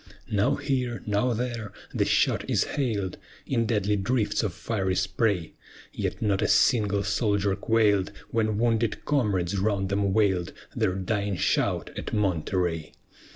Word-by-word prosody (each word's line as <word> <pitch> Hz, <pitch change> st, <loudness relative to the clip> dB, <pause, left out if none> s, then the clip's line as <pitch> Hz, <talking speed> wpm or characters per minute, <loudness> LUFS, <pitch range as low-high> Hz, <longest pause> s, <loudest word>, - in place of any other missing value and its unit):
Now 110 Hz, +7 st, +2 dB
here, 125 Hz, -4 st, -2 dB
now 105 Hz, +4 st, +1 dB
there, 115 Hz, -3 st, -3 dB, 0.2 s
the -, -, +1 dB
shot -, -, +1 dB
is -, -, +3 dB
hail'd 110 Hz, -10 st, -2 dB, 0.3 s
In 115 Hz, -3 st, 0 dB
deadly 105 Hz, -2 st, +1 dB
drifts 110 Hz, +2 st, 0 dB
of 105 Hz, -5 st, -1 dB
fiery 95 Hz, +1 st, -2 dB
spray, 95 Hz, -2 st, 0 dB, 0.4 s
Yet -, -, -3 dB
not 100 Hz, -2 st, +1 dB
a -, -, +2 dB
single 105 Hz, -5 st, +3 dB
soldier 100 Hz, -1 st, +1 dB
quail'd 105 Hz, -2 st, +2 dB, 0.2 s
When 110 Hz, -2 st, +1 dB
wounded 115 Hz, -1 st, 0 dB
comrades 100 Hz, -10 st, +1 dB
round 100 Hz, -1 st, 0 dB
them 100 Hz, 0 st, +1 dB
wail'd 95 Hz, -5 st, +1 dB, 0.2 s
Their 95 Hz, -, +1 dB
dying 100 Hz, +1 st, -1 dB
shout -, -, 0 dB
at -, -, -5 dB
Monterey. 90 Hz, -4 st, 0 dB
105 Hz, 140 wpm, -26 LUFS, 95-115 Hz, 0.4 s, is